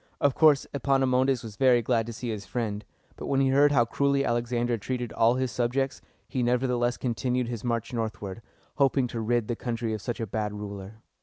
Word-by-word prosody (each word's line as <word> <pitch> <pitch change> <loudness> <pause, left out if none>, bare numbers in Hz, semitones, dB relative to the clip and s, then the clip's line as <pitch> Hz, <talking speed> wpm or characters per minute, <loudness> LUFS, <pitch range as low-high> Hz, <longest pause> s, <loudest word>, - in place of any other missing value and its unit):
Of 140 -2 +3
course, 150 -2 +5
Epaminondas 135 -2 +2
was 110 -2 -9
very 125 -3 +4
glad 115 -1 +1
to - - -4
see 120 +2 -5
his 105 -3 -4
friend; 110 -2 -3 0.3
but - - -6
when 135 -1 +1
he 135 -1 +3
heard 140 +2 +5
how 120 -5 +4
cruelly 140 +3 +1
Alexander 120 0 0
treated 120 +2 -4
all 115 +2 +3
his 130 -1 -1
subjects, 135 +3 -1 0.3
he 130 - -2
nevertheless 125 0 +1
continued 125 0 -1
his 120 -3 -5
march 115 -1 -2
northward, 110 -3 -4 0.4
hoping 135 -2 +3
to 115 - -4
rid 120 0 0
the 120 - -1
country 115 -1 -3
of 110 - -4
such 120 +1 -4
a 115 - -1
bad 105 0 -3
ruler. 105 +1 -8
120 Hz, 200 wpm, -27 LUFS, 115-130 Hz, 0.4 s, course